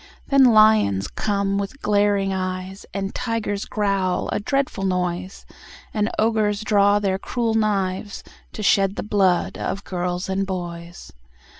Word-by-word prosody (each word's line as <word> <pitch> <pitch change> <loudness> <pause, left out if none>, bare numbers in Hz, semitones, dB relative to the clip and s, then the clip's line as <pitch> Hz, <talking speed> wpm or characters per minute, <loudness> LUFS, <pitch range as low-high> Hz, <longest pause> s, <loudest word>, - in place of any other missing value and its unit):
Then 275 -1 +6
lions 215 - +4
come 200 -1 -1
with 200 +8 -5
glaring 205 -1 +2
eyes, 185 +1 -4
And 195 0 -4
tigers 225 -4 -2
growl, 195 -3 -1
a - - 0
dreadful 270 -2 -1
noise, 180 0 -2 0.5
And 210 0 0
ogres 215 -2 +1
draw 205 -2 +4
their 195 -2 0
cruel 230 +1 -1
knives, 205 -2 -1 0.3
To 215 - -6
shed 195 -2 +3
the - - -4
blood 195 -4 +1
of 200 - -3
girls 180 0 -3
and 190 0 -1
boys. 175 -2 -7
200 Hz, 135 wpm, -22 LUFS, 185-210 Hz, 0.5 s, Then